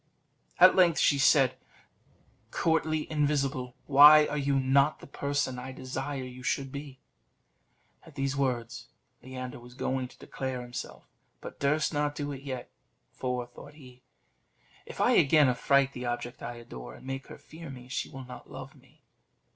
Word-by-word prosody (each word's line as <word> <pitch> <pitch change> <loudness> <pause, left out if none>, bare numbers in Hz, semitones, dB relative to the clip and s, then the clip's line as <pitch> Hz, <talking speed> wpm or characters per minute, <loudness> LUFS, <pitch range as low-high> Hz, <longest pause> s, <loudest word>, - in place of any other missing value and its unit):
At - - +8
length 175 -3 +5
she 140 - +3
said: 130 -2 +4 0.9
"Courtly 155 -1 0
invisible, 140 -4 0
why 150 +2 +8
are 150 - -3
you 140 -1 +1
not 140 +3 +3
the - - -12
person 140 -2 -2
I 130 +1 -7
desire 130 +1 -5
you 125 0 -9
should 135 +1 -2
be?" 140 -1 -8 1.0
At - - -17
these 135 0 -1
words, 125 -3 -2 0.3
Leander 130 -1 -7
was 120 +1 -14
going 130 -1 -2
to - - -19
declare 130 -2 -5
himself, 120 +1 -8 0.3
but - - -10
durst 150 +4 +1
not 145 0 0
do 145 -1 -4
it 135 -1 -7
yet; 130 -3 -6 0.4
"For," 125 -1 -3
thought 120 +4 -14
he, 125 -4 -15 0.9
"if - - -10
I - - +4
again 150 0 +5
affright 140 +2 +2
the 125 0 -5
object 120 0 -4
I 120 0 -5
adore, 60 - -10
and - - -15
make 135 0 -5
her - - -10
fear 165 0 -11
me, 125 -2 -10
she 130 - -3
will 135 -1 -9
not 125 0 -11
love 135 +1 -9
me." 135 +2 -24
135 Hz, 165 wpm, -29 LUFS, 125-145 Hz, 1.0 s, At